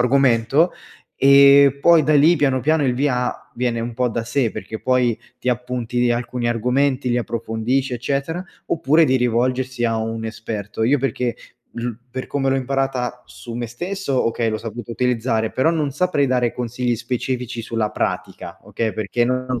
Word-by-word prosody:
argomento, 135 +5 +3 0.4
e 140 0 +6
poi 170 0 +6
da 155 +1 +2
lì 155 +4 +6
piano 135 -4 +1
piano 155 +1 +2
il 125 -2 +1
via 125 -2 0 0.2
viene 120 -1 -1
un 115 0 -4
po’ 125 0 +1
da 115 0 -3
sé, 120 -1 0
perché 110 - -7
poi 125 -3 +2 0.2
ti 125 - -4
appunti 125 0 -1
alcuni 120 0 -1
argomenti, 125 +3 +1
li 120 - +1
approfondisci, 120 +3 -2
eccetera, 140 +7 -2 0.2
oppure 160 +1 +3
di 130 - +2
rivolgersi 125 +1 0
a 115 -1 +1
un 115 0 -3
esperto. 110 -1 -5
Io 135 +5 +3
perché 125 -3 -2 0.4
ru 120 -1 -3 0.2
per 130 +1 -5
come 135 -1 -1
l’ho 135 - +2
imparata 130 -2 -2
su 120 -1 -10
me 120 0 -3
stesso, 175 - -2
okay, 115 0 0
l’ho 110 0 -2
saputa 115 +1 -7
utilizzare, 115 -2 0
però 155 +6 +2
non 150 -4 -1
saprei 150 -3 +1
dare 125 -2 +1
consigli 125 0 -2
specifici 120 0 -3
sulla 110 -2 -2
pratica, - - -4
okay, 115 -2 -3
perché 110 +3 -1
non 130 -1 -1
125 Hz, 165 wpm, -21 LUFS, 115-135 Hz, 0.4 s, e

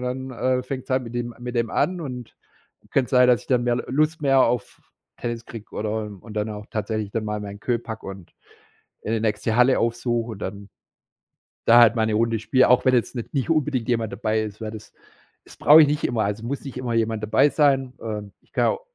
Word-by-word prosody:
da 125 0 -2
dann 130 -1 -2
fängt 130 -1 -5
es - - -18
an 130 -1 +1
mit 115 +1 -9
dem 120 -1 -3
mit 125 0 -6
dem 115 -1 0
an 180 0 0
und 125 -4 -7 0.5
könnte 130 -2 +2
es - - -17
sein, 125 0 +6
dass 120 -4 +4
ich - - -20
dann 125 -2 +2
mehr 120 0 +1
Lust 155 +4 +1
mehr 135 -1 +4
auf 120 -2 -1 0.4
Tennis 115 -1 -4
kriege 115 -2 -10
oder 110 +1 -2 0.2
und 110 -2 -11
dann 105 +1 -2
auch 105 0 -7
tatsächlich 110 -1 -3
dann 110 -1 -2
mal 105 0 -3
meinen 100 0 -7
Queue 120 +1 0
packe 110 -1 -8
und 95 -3 -9 0.7
eine 110 +1 0
nächste 110 +1 -1
Halle 125 +1 +5
aufsuche 120 0 -1
und 100 - -8
dann 100 +1 -6 1.0
da 120 +1 +8
halt 120 0 +6
mal 110 - +2
'ne 110 - -1
Runde 115 0 +1
spiele, 130 +2 +3
auch 125 - +5
wenn 130 - +4
jetzt 120 +2 0
nicht 120 - -6
nicht 135 +3 -1
unbedingt 145 -7 0
jemand 115 -3 0
dabei 110 0 -1
ist, 105 0 -7
weil 110 0 -5
das 110 -1 -11 0.5
das - - -15
brauche 155 +2 +7
ich - - +5
nicht 150 0 -1
immer, 110 -3 0
also 105 +3 -3
muss 140 +2 -4
nicht 135 -2 -8
immer 125 -2 -3
jemand 115 -1 0
dabei 110 +7 +4
sein. 135 -4 +2
Ähm, 105 -3 -5
ich - - -34
kann - - +2
au 475 - -1
120 Hz, 230 wpm, -23 LUFS, 110-130 Hz, 1.0 s, da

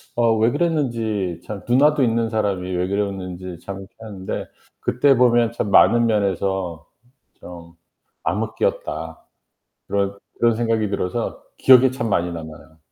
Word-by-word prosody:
어 115 -2 +3
왜 110 +2 +3
그랬는지 115 - -1
참 105 -2 -6
누나도 140 +3 +4
있는 115 -1 +1
사람이 100 -5 -1
왜 90 +1 0
그랬는지 95 -3 -4
참 100 - -5
그렇긴 95 +4 -13
한데 100 -4 -6 0.3
그때 135 +3 +3
보면 120 -2 +4
참 105 - -2
많은 115 +4 +5
면에서 95 -6 -1 0.5
좀 85 -1 -11 0.5
암흑기였다. 80 +1 -3 0.6
그런 100 0 -1 0.2
그런 120 -1 +3
생각이 115 -2 0
들어서 100 +3 -3 0.2
기억에 130 0 +7
참 120 -3 -3
많이 90 -3 +1
남아요. 80 -1 -10
105 Hz, 285 characters per minute, -21 LUFS, 90-120 Hz, 0.6 s, 기억에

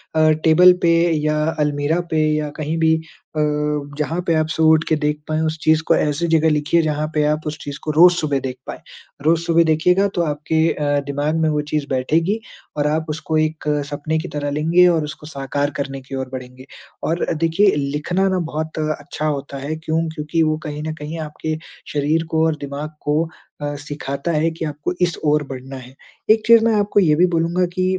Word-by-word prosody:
अ, 155 0 +4
table 180 +3 +7
पे 170 - +4 0.3
या 150 0 +1 0.2
अलमीरा 150 +3 +1
पे 160 - +2 0.2
या 150 -1 -2
कहीं 155 +1 -2
भी 160 0 +3 0.4
अ, - - +2 0.6
जहाँ 165 +4 -1
पे 165 - +3
आप 155 0 +1
सुबह 160 -1 +3
उठ 160 0 +5
के 160 - +2
देख 150 0 0
पाएँ 155 0 0
उस 160 0 -2
चीज़ 155 0 +4
को - - +5
ऐसी 150 +3 0
ज़गह 160 -1 +3
लिखिए 150 +3 +2
जहाँ 155 -1 -1
पे 150 -1 +2
आप 150 +1 +1
उस 150 +1 -4
चीज़ 145 -1 -6
को 155 - -1
रोज़ 175 +4 +7
सुबह 150 -5 0
देख 130 -1 -4
पाएँ। - - -6 0.5
रोज़ 165 +1 +3
सुबह 170 0 +3
देखिएगा 180 +5 +3
तो 175 - +1
आपके 155 +1 0
अ, 145 -1 0
दिमाग 145 +3 -1
में 160 - +2
वो 150 -1 0
चीज़ 150 -2 -1
बैठेगी 165 - +1 0.4
और 145 0 +1
आप 155 +1 0
उसको 155 0 -2
एक 155 0 -1 0.2
सपने 150 +2 -2
की 175 - -5
तरह 145 -1 -2
लेंगे 165 +5 +4
और 165 -3 +2
उसको 150 0 -8
साकार 145 0 -2
करने 135 -1 -4
की 135 +1 -8
ओर 130 -1 -4
बढ़ेंगे। 125 0 -8 0.4
और 165 +2 0
देखिए 165 +6 +3
लिखना 150 +7 0
ना 185 - 0
बहुत 160 -1 -4
अच्छा 155 0 -3
होता 140 -2 -3
है। 145 +3 -4
क्यों? 160 +1 -1
क्योंकि 155 +1 -1
वो 155 0 +1
कहीं 150 0 -5
न 155 0 -3
कहीं 155 +2 -6
आपके 155 0 -4 0.4
शरीर 150 +3 +1
को 160 0 +2
और 160 -1 +1
दिमाग 140 +2 -5
को 150 +2 +1 0.4
अ, 145 0 -3
सिखाता 145 +2 -4
है 160 +1 +2
कि 160 0 -5
आपको 150 +3 -3
इस 175 -1 +1
ओर 150 0 +3
बढ़ना 130 +1 -7
है। 130 0 -12 0.4
एक 220 - +4
चीज़ 230 -1 +7
मैं 230 - +3
आपको 205 0 +2
ये 155 -6 +4
भी 175 +4 +5
बोलूँगा 170 +2 +1
कि 185 -1 -1
155 Hz, 210 wpm, -20 LUFS, 145-165 Hz, 0.6 s, table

